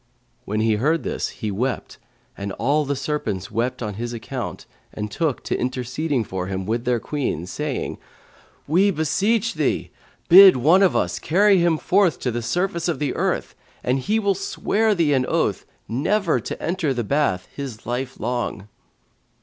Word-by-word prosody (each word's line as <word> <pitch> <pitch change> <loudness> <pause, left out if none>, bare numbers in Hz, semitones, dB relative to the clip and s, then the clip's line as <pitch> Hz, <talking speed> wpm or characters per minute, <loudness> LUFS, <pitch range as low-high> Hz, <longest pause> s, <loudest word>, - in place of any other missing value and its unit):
When 105 +2 -1
he 110 -1 +2
heard 155 +8 +1
this, - - -2
he 110 -4 -5
wept 125 +6 -3 0.4
and 100 0 -5
all 145 +4 +1
the 140 +1 -1
serpents 130 - -3
wept 120 +2 -1
on 105 -1 -3
his 120 0 -3
account 115 -1 -5 0.3
and 105 0 -5
took 155 +1 -1
to - - -1
interceding 130 +2 -1
for 95 -3 -4
him 95 -1 -3
with 115 +4 -2
their 125 -1 +1
Queen, 130 - -3
saying, 145 +8 -4 0.7
"We 185 +7 +3
beseech 200 +7 +1
thee, - - -1 0.4
bid 190 -3 +9
one 160 +10 +5
of 190 - +4
us 90 0 0
carry 195 +3 +4
him 170 -2 +3
forth 185 0 +2
to 125 - -1
the 120 +1 -3
surface 170 +8 -1
of 170 - 0
the 150 - -1
earth, - - -1 0.3
and 125 +2 +1
he 210 +12 0
will 200 -2 +2
swear 205 +3 0
thee 160 -5 +2
an 130 -2 +2
oath - - 0 0.2
never 160 - +1
to - - -6
enter 165 -6 -1
the 120 - -1
bath 125 -7 0
his 130 -6 -7
life 125 +2 -4
long." 120 -4 -3
140 Hz, 170 wpm, -22 LUFS, 115-170 Hz, 0.7 s, bid